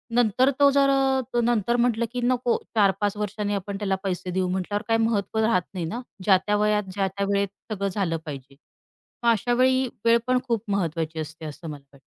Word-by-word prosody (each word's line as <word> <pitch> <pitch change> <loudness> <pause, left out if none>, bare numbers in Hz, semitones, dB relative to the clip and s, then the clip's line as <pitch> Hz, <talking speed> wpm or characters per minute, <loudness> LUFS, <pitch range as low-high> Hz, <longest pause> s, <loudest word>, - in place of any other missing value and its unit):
नंतर 245 +2 +3
तो 285 0 +7
जर 275 0 +4
अ, 265 -2 +1
नंतर 235 -1 +1
म्हटलं 235 -1 +2
की 250 - -3
नको 245 -1 +1 0.2
4-5 200 -1 +2
वर्षांनी 210 0 -2
आपण 200 +1 -4
त्याला 195 -2 0
पैसे 185 -1 -3
देऊ 185 0 0
म्हटल्यावर 190 +3 -2
काही 225 0 +2
महत्त्व 220 -1 -1
राहत 220 -5 +3
नाही 175 -3 -3
ना, 230 +9 -4 0.2
ज्या-त्या 195 +1 +3
वयात, 210 0 +2
ज्या-त्या 195 0 -1
वेळेत 200 0 +1 0.2
सगळं 200 -1 -1
झालं 180 -4 -1
पाहिजे 135 -2 -8 0.7
मग 235 - +4
अशावेळी 255 +4 +2 0.2
वेळ 230 0 +6
पण 255 0 +3
खूप 230 -3 0
महत्त्वाची 165 -4 -1
असते 160 +1 -7
असं 155 +2 -8
मला 145 -2 -8
वाटतं. 140 - -18
205 Hz, 185 wpm, -25 LUFS, 185-235 Hz, 0.7 s, तो